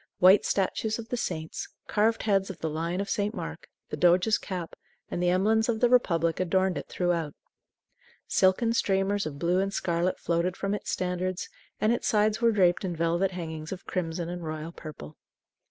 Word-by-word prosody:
White 190 +3 +6
statues 215 +3 0
of 230 -1 -8
the - - -1
saints, 160 -9 -4 0.2
carved 220 +2 +1
heads 195 -2 +2
of 190 - -6
the 160 - -3
lion 165 +4 -2
of 200 - -4
St. 205 +1 -1
Mark, - - -7 0.2
the - - -1
doge's 180 +5 +4
cap, 180 -4 -5 0.4
and 175 - -2
the 180 - +3
emblems 220 +5 +2
of 225 -2 +1
the 245 - +4
Republic 170 -10 +2
adorned 185 +1 +1
it - - -9
throughout. 170 -4 -1 0.9
Silken 210 +5 +3
streamers 195 -3 +1
of 140 -2 -6
blue 175 +4 +1
and 195 +1 0
scarlet 175 -1 0
floated 170 +2 -1
from 195 0 -1
its 210 - -4
standards; 180 0 -2 0.3
and 215 +2 +3
its 240 - -2
sides 215 +1 +2
were 230 -1 +5
draped 185 -4 +3
in 180 -3 -2
velvet 170 +3 +1
hangings 160 -3 -6
of 190 -1 -7
crimson 170 -2 -3
and 175 0 -5
royal 155 +1 -5
purple. 150 - -10
185 Hz, 185 wpm, -28 LUFS, 170-205 Hz, 0.9 s, White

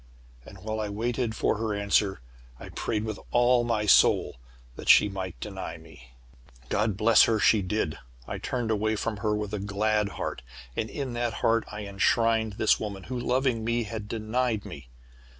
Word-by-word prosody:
"And, 100 - -11
while 110 +3 -4
I 105 -1 -2
waited 115 +2 -2
for - - +1
her 110 -2 -1
answer, 100 -5 +1 0.4
I - - -9
prayed 105 -1 -2
with 110 -2 -4
all 120 0 +4
my 115 -3 0
soul 95 -9 +4 0.4
that - - -6
she - - +8
might 95 -3 -6
deny 95 -5 -6
me. 75 -7 -16 0.6
"God 105 -2 0
bless 110 +1 +6
her! 110 -1 +1
She 105 0 +4
did! 90 -5 -2 0.3
I - - -5
turned 120 -3 -2
away 110 +1 +1
from 110 0 -3
her 105 +1 0
with 105 0 -4
a 105 - -2
glad 105 +1 0
heart, - - -4 0.3
and 110 - -2
in 135 -4 -4
that 120 -1 -1
heart 115 0 +3
I 105 0 -6
enshrined 110 +2 +1
this 110 +2 +2
woman, 100 -3 -5
who, 125 +3 -5
loving 125 -1 0
me, 115 +1 0
had 105 -1 -6
denied 110 0 -1
me. 70 -4 -10
110 Hz, 180 wpm, -27 LUFS, 100-115 Hz, 0.6 s, she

